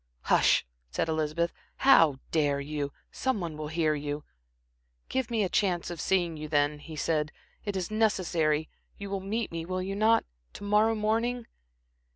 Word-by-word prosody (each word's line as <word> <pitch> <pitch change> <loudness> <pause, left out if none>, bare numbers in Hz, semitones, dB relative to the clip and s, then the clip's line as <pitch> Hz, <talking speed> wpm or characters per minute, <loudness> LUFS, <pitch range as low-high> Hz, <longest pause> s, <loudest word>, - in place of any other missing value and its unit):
"Hush," - - +4 0.2
said 160 - -1
Elizabeth. 160 +2 0 0.2
"How 165 - +6
dare 145 -3 +2
you? 145 0 -3 0.2
Some 260 -5 -1
one 170 -4 -4
will 155 0 -5
hear 155 0 +1
you." 145 0 -3 0.9
"Give 260 -3 -1
me 225 -3 +1
a - - +1
chance 180 -3 0
of 170 -3 -5
seeing 175 -4 +1
you, 155 0 -5
then," 145 0 +1
he 155 +1 -9
said. 155 0 0 0.3
"It 205 -2 -2
is 185 +1 -2
necessary. 170 -8 +1 0.3
You 200 -1 -7
will 195 - -1
meet 215 +4 -2
me 165 -1 -3
will 185 +2 -2
you 195 +1 -3
not? 220 +2 +4 0.3
to - - -9
morrow 210 +2 +3
morning?" 230 +3 0
170 Hz, 170 wpm, -29 LUFS, 155-210 Hz, 0.9 s, How